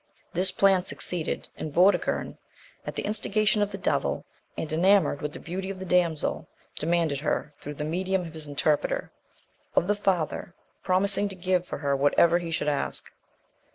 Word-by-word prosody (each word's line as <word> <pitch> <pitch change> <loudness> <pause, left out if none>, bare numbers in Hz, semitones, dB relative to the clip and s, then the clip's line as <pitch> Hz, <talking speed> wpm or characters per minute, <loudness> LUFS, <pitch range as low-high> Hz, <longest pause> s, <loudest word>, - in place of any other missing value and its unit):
This 185 +2 +2
plan 195 0 +4
succeeded; 180 -2 -2
and 155 - -5
Vortigern, 185 +6 +2 0.5
at - - -4
the - - -2
instigation 215 0 +1
of 205 0 +1
the 195 - -5
devil, 185 - -1 0.3
and 155 - -4
enamoured 180 -3 +3
with 150 - -3
the - - -7
beauty 190 +3 -5
of 195 - -5
the 190 - -6
damsel, 175 -4 +1 0.3
demanded 160 -3 +1
her, 150 0 -2
through 145 +1 -7
the 150 - -4
medium 185 +4 -1
of 165 - -9
his 155 -2 -6
interpreter, 145 +1 0 0.6
of - - +4
the 205 - +2
father, 180 -3 -1 0.3
promising 200 +2 +2
to 195 - -7
give 180 -1 0
for - - -4
her 140 -1 0
whatever 165 +5 +4
he 170 -1 -5
should 160 -2 -2
ask. 145 -1 -2
175 Hz, 170 wpm, -27 LUFS, 155-190 Hz, 0.6 s, plan